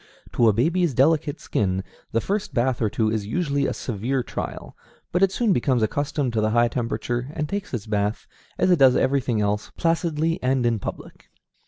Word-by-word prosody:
To 115 -2 +4
a - - +6
baby's 160 - +1
delicate 150 +2 +2
skin, 95 -2 -1 0.3
the 115 - +1
first 205 -1 -3
bath 125 0 +1
or 110 - +2
two 110 +1 0
is 110 -2 -2
usually 140 -1 0
a - - -1
severe 125 +3 -2
trial, - - -6 0.4
but 180 - +1
it 195 -1 +4
soon 220 -1 +2
becomes 125 -3 +1
accustomed 140 +2 -1
to 110 - +1
the 110 - +2
high 120 +1 +3
temperature, 120 +1 -2
and 150 -1 -2
takes 200 +4 -4
its 115 -4 -4
bath, 105 0 -1 0.3
as 185 - +3
it 175 - +4
does 130 -2 +6
everything 130 -5 +1
else, 105 0 -1
placidly 165 -1 0
and 130 -1 +1
in 115 -2 +1
public. - - -8
130 Hz, 190 wpm, -24 LUFS, 110-160 Hz, 0.4 s, a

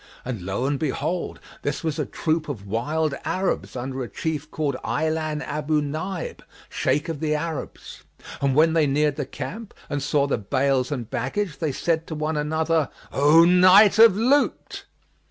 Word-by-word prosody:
And 125 -6 -4
lo 95 +7 -2
and 140 0 0
behold! 160 +4 -2 0.2
this 145 - -3
was 160 -2 -2
a - - -1
troop 155 -1 -1
of 110 -9 -6
wild 145 +9 -1
Arabs 185 -6 -2
under 130 +1 -4
a 120 - -5
chief 150 +6 -4
called 150 -4 -2
Ajlбn 155 -1 -1
Abъ 150 +1 0
Nбib, 175 +3 -4 0.3
Shaykh 145 +5 0
of 165 -3 -4
the 155 -1 0
Arabs, 155 0 -6 0.4
and 135 -2 +1
when 160 +2 +4
they 160 -3 +3
neared 145 +1 +1
the 145 -4 -3
camp 220 +8 -7 0.2
and 145 0 -1
saw 140 0 +1
the 140 -5 -1
bales 130 +4 0
and 125 -6 -3
baggage, 150 - -2
they 155 -3 -1
said 165 +3 -1
one 155 0 -2
to 150 - 0
another, 160 0 0 0.2
"O 150 +4 +6
night 185 +4 +6
of 225 -4 +8
loot!" 265 +6 +1
150 Hz, 170 wpm, -24 LUFS, 140-165 Hz, 0.4 s, of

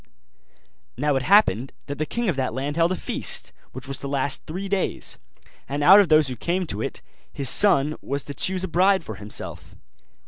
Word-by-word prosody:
Now 145 +2 0
it 135 - 0
happened 135 - +3
that 145 0 -7
the 155 - -2
king 235 -1 -2
of 175 - 0
that 130 -4 -2
land 140 +3 -3
held 170 +1 +2
a - - 0
feast, - - -3 0.2
which 130 +1 -10
was 135 -1 -4
to 140 - -5
last 140 0 -2
three 185 +5 -5
days; 195 -1 -1 0.5
and 145 +1 -2
out 190 +6 +8
of 195 -5 +3
those 155 -2 +5
who 130 - -4
came 180 +9 -2
to 110 -9 -5
it - - -5 0.3
his 135 -2 +3
son 155 -7 +4
was 140 0 -4
to 145 - -7
choose 185 +6 -1
a - - -2
bride 190 +2 +2
for 110 - -7
himself. 105 +1 -6
150 Hz, 205 wpm, -23 LUFS, 135-185 Hz, 0.5 s, out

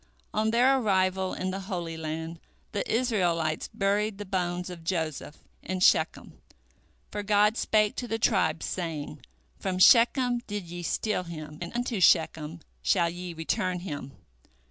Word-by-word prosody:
" - - -39
On 215 +1 +1
their 255 +4 +4
arrival 190 -3 +1
in 185 0 -2
the 190 - -4
Holy 170 -4 -3
Land, 160 +1 -5 0.3
the 205 - -2
Israelites 175 -10 0
buried 205 +1 0
the 205 - -6
bones 180 -1 -2
of 170 -2 -9
Joseph 160 -4 -3 0.2
in 185 0 -3
Shechem, 180 - +2 0.7
for 205 - -3
God 210 +1 +3
spake 215 -3 +2
to 245 - -3
the 225 - -1
tribes, 185 -8 +1
saying, 155 -4 -4 0.4
"From 190 -2 -2
Shechem 245 +4 +5
did 205 -3 -4
ye 175 +1 -7
steal 180 +2 -1
him, 155 -2 -8
and 175 - -5
unto 240 -4 -1
Shechem, 160 -1 +3 0.2
shall 170 -3 +2
ye 175 0 -7
return 180 +2 -1
him." 145 -6 -6
185 Hz, 150 wpm, -28 LUFS, 165-210 Hz, 0.7 s, Shechem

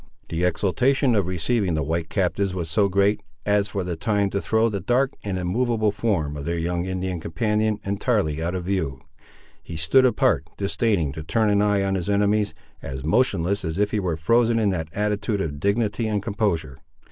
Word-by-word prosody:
The 85 +1 -2
exultation 125 - +2
of 100 -5 +1
receiving 95 +1 0
the 75 - 0
white 80 +2 -2
captives 95 0 0
was 85 -3 -4
so 100 +2 +3
great, 100 +2 +2 0.2
as 105 0 +2
for 100 -3 -3
a 90 -1 -3
time 100 +2 0
to 100 - -1
throw 110 +1 +2
the 105 -3 -2
dark 130 +6 +1
and 100 -2 -2
immovable 110 +4 +1
form 95 -9 -1
of 70 - -6
their 85 +3 -2
young 85 +1 -1
Indian 95 -1 -3
companion 105 +6 0
entirely 100 - 0
out 85 +3 -2
of 90 - -3
view. 90 -9 -2 0.6
He 85 - -8
stood 80 +12 +4
apart, 85 - +2
disdaining 100 -6 0
to 80 +3 -7
turn 110 +5 +1
an 100 0 +3
eye 105 -1 +2
on 95 0 0
his 95 0 -2
enemies, 105 +1 +1 0.3
as 65 0 -6
motionless 100 -2 +1
as 80 -2 -3
if 105 0 +1
he 105 - 0
were 90 -5 -1
frozen 115 +7 +3
in 105 -3 +2
that 80 -4 -3
attitude 105 +1 -1
of 75 -6 -3
dignity 105 +4 0
and 105 -2 -1
composure. 100 - -1
100 Hz, 195 wpm, -24 LUFS, 85-105 Hz, 0.6 s, stood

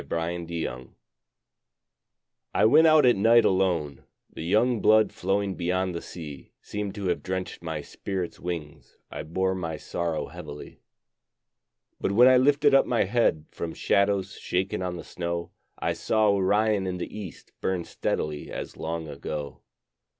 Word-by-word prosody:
Winter 85 0 -3
Stars 65 -3 -5 1.7
I - - +4
went 155 +8 +7
out 155 -3 +6
at 120 - +6
night 115 +4 +5
alone; 85 -7 +1 0.3
The - - -7
young 110 +8 +2
blood 110 0 +5
flowing 95 +1 0
beyond 90 +1 -1
the 85 - -4
sea 75 -6 -9
Seemed 105 -1 -5
to 100 -2 -5
have - - 0
drenched 95 0 -4
my 80 -3 -4
spirit's 95 +3 -5
wings 85 -4 -6
I - - -5
bore 95 +5 -1
my 85 -4 -4
sorrow 85 -1 -3
heavily. 75 -4 -10 1.2
But 100 - -1
when 120 +5 +7
I 130 0 +7
lifted 145 +2 +4
up 135 - +5
my 120 - +2
head 115 -10 +1
From 85 -1 -5
shadows 100 0 +1
shaken 95 +1 -1
on 90 -1 -2
the - - -7
snow, 85 -1 -4 0.3
I - - -1
saw 110 -1 +2
Orion 100 +1 +2
in 90 -1 -2
the 90 - -6
east 100 -7 -9
Burn 95 -2 -1
steadily 75 -2 -3
as - - -6
long 80 0 -4
ago. 75 0 -6
95 Hz, 150 wpm, -26 LUFS, 85-105 Hz, 1.7 s, went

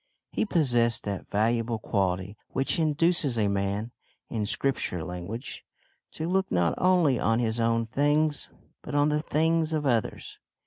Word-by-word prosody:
He - - -1
possessed 120 - +2
that 100 -2 -5
valuable 115 +2 +1
quality 95 -2 -1
which 135 +5 0
induces 155 -4 +2
a 105 -2 +2
man 100 +3 -1 0.4
in 110 -3 -2
Scripture 115 -8 -1
language 90 +9 -6 0.5
to 160 - -4
look 190 +2 0
not 90 -1 +2
only 175 -9 +3
on 115 +2 +2
his 115 -1 -1
own 115 0 +1
things 145 +5 +1 0.3
but 145 - -6
on 145 +1 +3
the 150 0 +1
things 160 +1 +1
of 150 -2 -1
others. 120 -5 -1
120 Hz, 145 wpm, -27 LUFS, 105-150 Hz, 0.5 s, only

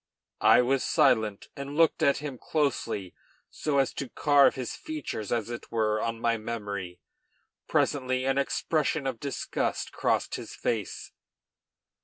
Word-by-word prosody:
I - - +7
was 135 +1 +1
silent, 110 -4 +2
and 140 0 -6
looked 165 -1 +4
at 140 - +4
him 140 -4 -6
closely 120 - -1 0.4
so 150 -2 -1
as 135 -1 +2
to 140 - -5
carve 145 -2 +4
his 130 -3 -4
features, 145 -9 -5
as 115 -1 -1
it 120 - -7
were, 110 -1 +1
on 115 0 -2
my 115 0 +1
memory. 100 -5 -5 0.7
Presently 130 -2 +1
an 135 +1 +2
expression 150 +1 0
of 130 -4 -2
disgust 140 -1 -2
crossed - - 0
his - - -8
face. - - -3
130 Hz, 140 wpm, -28 LUFS, 110-140 Hz, 0.7 s, I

